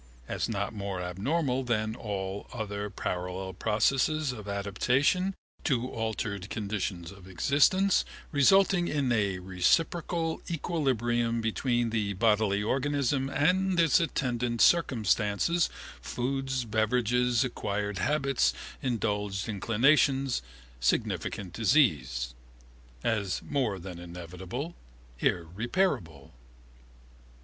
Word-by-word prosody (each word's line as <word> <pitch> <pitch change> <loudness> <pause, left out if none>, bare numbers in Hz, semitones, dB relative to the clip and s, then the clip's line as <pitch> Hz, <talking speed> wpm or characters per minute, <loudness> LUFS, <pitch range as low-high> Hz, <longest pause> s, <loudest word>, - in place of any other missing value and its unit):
As - - -2
not 100 -1 -2
more 100 -3 -4
abnormal 125 - -1
than 110 -3 -1
all 100 -3 -4
other 105 -3 -4
parallel 90 0 -4
processes 130 - +1
of 105 -4 -8
adaptation 125 - +1 0.3
to 125 -5 +1
altered 105 -3 -3
conditions 100 -5 -3
of 100 -2 -14
existence, 165 - +3 0.3
resulting 175 +5 +4
in 140 -4 0
a 100 -5 +1
reciprocal 160 - 0
equilibrium 120 -8 0
between 120 +1 0
the 105 -3 0
bodily 105 -1 +2
organism 135 +2 0
and 180 +6 +2
its 165 0 +5
attendant 125 -7 -1
circumstances, 120 - +3 0.3
foods, 135 0 -2
beverages, 120 +2 +2
acquired 105 -5 -3
habits, 140 - +1 0.3
indulged 105 -5 -1
inclinations, 130 +5 +2 0.4
significant 90 +8 -1
disease. 75 - +2 0.7
As 105 -5 -1
more 125 -8 -1
than 90 -1 -8
inevitable, 90 - -6 0.5
irreparable. 90 - -1
115 Hz, 90 wpm, -29 LUFS, 100-140 Hz, 0.7 s, its